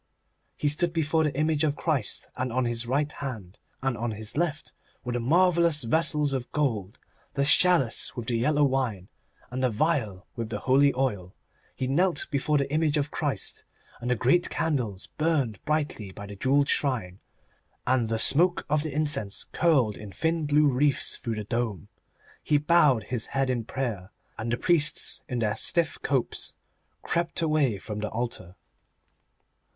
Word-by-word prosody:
He 150 - -1
stood 165 +4 +1
before 160 0 +1
the 145 - -2
image 155 0 +1
of 150 -2 +1
Christ, 155 -5 -1
and 125 0 -3
on 125 +1 0
his 120 0 -1
right 145 +4 0
hand 110 -12 -7 0.2
and 135 -2 0
on 120 +1 -3
his 110 +1 -4
left 155 -1 -2 0.3
were 125 - -4
the 120 - -1
marvellous 170 +2 +3
vessels 150 +2 +1
of 130 -2 -4
gold, 115 -8 -1 0.4
the 140 - +1
chalice 155 -7 +4
with 120 -3 -5
the 120 - 0
yellow 145 +6 +2
wine, 130 -9 -1 0.4
and 130 +1 -3
the 130 - +2
vial 110 - -1
with 115 -2 -4
the 105 -2 -4
holy 140 +2 +4
oil. 105 -9 -2 0.4
He 130 - -3
knelt 155 +4 +1
before 145 +2 +1
the 140 -1 -1
image 155 -1 +1
of 145 0 -1
Christ, - - -3 0.4
and 120 - -4
the 125 - +2
great 130 +10 +2
candles 120 -11 -2
burned 145 - 0
brightly 145 -10 -2
by 100 - -9
the 100 0 -9
jewelled 135 +6 +2
shrine, 110 -10 -1 0.7
and 125 -3 +1
the 115 - 0
smoke 170 +10 +4
of 150 -1 +3
the 155 0 -4
incense 145 -9 0
curled 135 -11 +2
in 105 -2 -9
thin 160 - -1
blue 150 +1 +4
wreaths 140 +1 +2
through 115 -2 -4
the 105 - -4
dome. 110 -6 -3 0.5
He 150 - +2
bowed 145 - +4
his 120 0 -2
head 135 -1 +2
in 120 -3 -2
prayer, 110 -8 -4 0.3
and 115 +1 -4
the 120 - 0
priests 155 -3 +3
in 125 - -2
their 110 -2 0
stiff 165 +5 -1
copes 135 -3 -2 0.5
crept 170 0 -1
away 150 -9 +1
from 105 +3 -6
the 105 0 -3
altar. 110 -6 -5
135 Hz, 170 wpm, -27 LUFS, 115-150 Hz, 0.7 s, chalice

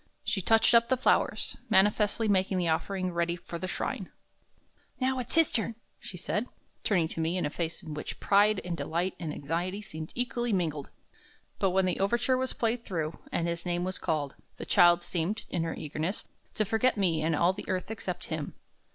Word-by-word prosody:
She 205 -5 0
touched 225 +5 +4
up 235 0 +5
the 260 - +3
flowers, - - +2
manifestly 210 +2 +3
making 190 -1 +2
the 175 -2 +1
offering 185 +3 -1
ready 170 0 0
for 170 0 -7
the 185 - -3
shrine. - - -3 0.9
"Now 260 0 +1
it's 250 - -3
his 325 -2 +5
turn," 225 0 -1 0.2
she 180 - -7
said, 210 +6 -2 0.4
turning 180 -7 +2
to - - -5
me 165 +3 0
a 160 -5 0
face 170 +3 -4
in 155 -3 -6
which 150 - -6
pride 205 0 +4
and 175 -1 -2
delight 170 +5 -1
and 165 -4 -3
anxiety 170 +7 -2
seemed 160 -6 -7
equally 240 -1 -1
mingled. 155 -6 -1 0.7
But 195 - +3
when 190 +1 +2
the 180 - 0
overture 240 +6 +2
was 260 0 0
played 230 +1 0
through, 160 -7 -3
and 170 - 0
his 170 0 -2
name 175 -1 -1
was 185 0 -2
called, 150 -5 -1 0.2
the - - -6
child 175 0 +5
seemed, 175 +5 -2
in 175 - 0
her 165 0 -2
eagerness, 155 +4 -3 0.3
to 215 - +1
forget 225 +4 +2
me 170 -6 +2
and 160 0 +1
all 175 +4 +3
the 205 - -8
earth 185 +2 -2
except 190 -5 -4
him. 155 -2 -4
185 Hz, 195 wpm, -29 LUFS, 165-215 Hz, 0.9 s, up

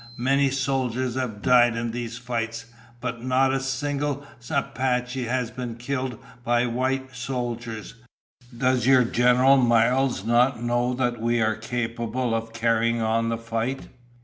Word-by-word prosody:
Many 135 +3 +2
soldiers 130 -2 -1
have 115 -5 -4
died 120 -2 +5
in 115 0 -2
these 115 0 -5
fights, 115 -2 -4 0.4
but 120 -1 -4
not 130 +1 +2
a 135 - +1
single 145 +1 -2 0.2
Apache 125 0 -1
has 125 0 -1
been 125 -2 -5
killed 130 0 -3 0.3
by 120 +1 +2
white 130 +2 -2
soldiers. 120 -3 -4 0.6
Does 125 -1 +1
your 130 -2 +6
General 125 +3 +4
Miles 120 -1 +2
not 120 +2 +3
know 120 +1 0
that 120 -2 -1
we 120 +1 +1
are 110 -1 +2
capable 115 +1 -2
of 115 0 -2
carrying 115 +1 +1
on 115 +1 +1
the 115 - -1
fight?" 115 +3 -3
120 Hz, 140 wpm, -25 LUFS, 115-130 Hz, 0.6 s, your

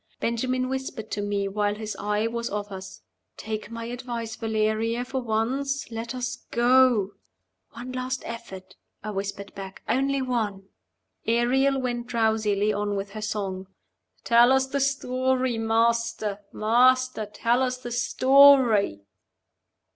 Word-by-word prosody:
Benjamin 255 +2 -1
whispered 265 -4 -5
to 205 - -2
me 205 -1 -1
while 205 +1 0
his 215 0 -5
eye 210 +1 0
was 235 +1 -2
off 205 0 -4
us, 190 0 -9 0.3
"Take 215 0 -5
my 230 0 -6
advice, 235 -2 -5
Valeria, 225 +2 -1
for 265 +1 -3
once; 255 +5 -1
let 230 +2 -5
us 250 0 -3
go." 240 -4 +4 0.6
"One 245 +3 -7
last 255 0 -3
effort," 190 -5 -8 0.3
I 215 - -4
whispered 200 0 -5
back. 195 -1 -9
"Only 270 +4 +1
one!" 215 -7 -2 0.6
Ariel 260 +4 +2
went 240 -2 -3
drowsily 220 -3 +1
on 205 0 -1
with 195 0 -4
her 215 +1 -7
song 195 -3 -3 0.6
"Tell 240 +1 +5
us 265 0 +4
the 275 +1 -2
story. 260 -2 0
Master! 225 -2 +1
master! 250 +1 +3
tell 235 +4 0
us 255 -1 0
the 245 -1 -8
story." 255 - +5
230 Hz, 130 wpm, -25 LUFS, 210-255 Hz, 0.6 s, Tell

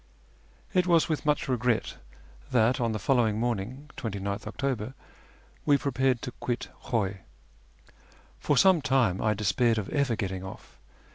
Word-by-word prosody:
It 180 -2 +3
was 170 -2 +4
with 155 -2 -2
much 150 +2 +2
reoret 125 -3 0 0.5
that 125 +2 +3
on 115 -1 +1
the 110 - -2
followino; 110 +1 +2
morniucf 120 +5 -3
(29th 100 -4 -4
October) 130 -3 -3 0.7
we 145 -2 +4
prepared 130 -3 0
to 125 - -4
quit 120 +1 -4 0.2
Khuy. 100 -5 -1 1.2
For 145 - +1
some 185 +2 +6
time 120 -9 +2
I 110 -1 +2
despaired 110 +3 +2
of 105 -3 -3
ever 140 -5 +1
getting 95 -3 -3
off. 95 - -11
120 Hz, 140 wpm, -28 LUFS, 105-135 Hz, 1.2 s, some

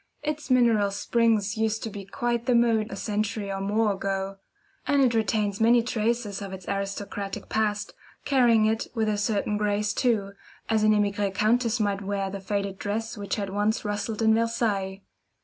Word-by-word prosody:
Its 300 -1 -3
mineral 230 -5 +4
springs 215 0 +1
used 220 0 0
to 225 - -3
be 200 0 -7
quite 240 +4 -2
the 250 - +4
mode 230 -2 +3
a - - -6
century 210 0 -2
or 195 0 -3
more 210 +1 +1
ago; 195 0 -3 0.5
and 285 -1 +4
it 245 -2 +3
retains 215 -2 0
many 235 +1 +5
traces 225 -3 -1
of 195 -1 -6
its 190 -2 -9
aristocratic 200 0 -4
past, 210 -1 -1 0.3
carrying 240 -6 +4
it 220 +1 0
with 220 -1 +1
a 210 - +1
certain 210 0 0
grace, 210 0 0
too, 220 -6 +1 0.4
as 220 -1 +2
an 215 0 +4
emigre 205 -1 +1
countess 230 +4 +1
might 200 -2 0
wear 195 -1 -2
the 200 - -5
faded 200 0 -3
dress 225 +3 -3
which 200 -2 -3
had 200 -3 -3
once 205 +2 0
rustled 210 +2 -2
in 220 0 +5
Versailles. 220 -4 0
210 Hz, 175 wpm, -26 LUFS, 200-225 Hz, 0.5 s, many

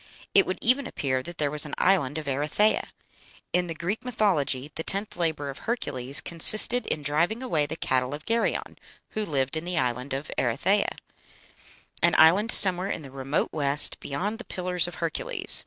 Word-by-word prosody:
It 195 - +5
would 185 - -2
even 255 +3 +3
appear 130 -2 -2
that 170 +5 -9
there 145 -2 -1
was 150 -1 +3
an 150 - -5
island 160 -7 +2
of 155 - -5
Erythea. 150 +10 +1 0.7
In 180 0 +1
the 165 - -5
Greek 180 +7 -4
mythology 155 - 0
the - - -5
tenth 200 +5 -3
labor 160 -5 -2
of 135 - -12
Hercules 140 - -3
consisted 215 +8 +5
in 150 - -2
driving 170 - 0
away 155 - 0
the 160 - -5
cattle 130 -2 -1
of 150 - -12
Geryon, 230 0 -2 0.3
who 215 - -4
lived 135 -6 -2
in 155 - -3
the 175 0 -3
island 125 +2 -2
of 135 +2 -5
Erythea, 185 - 0 1.0
"an 170 -1 +3
island 190 +8 +5
somewhere 185 0 +4
in 160 - -4
the 135 - -11
remote 135 +2 -2
west, 145 -1 +2
beyond 200 - -4
the - - -6
Pillars 180 -2 -1
of 175 - -8
Hercules." 165 -2 +4
160 Hz, 180 wpm, -26 LUFS, 140-195 Hz, 1.0 s, It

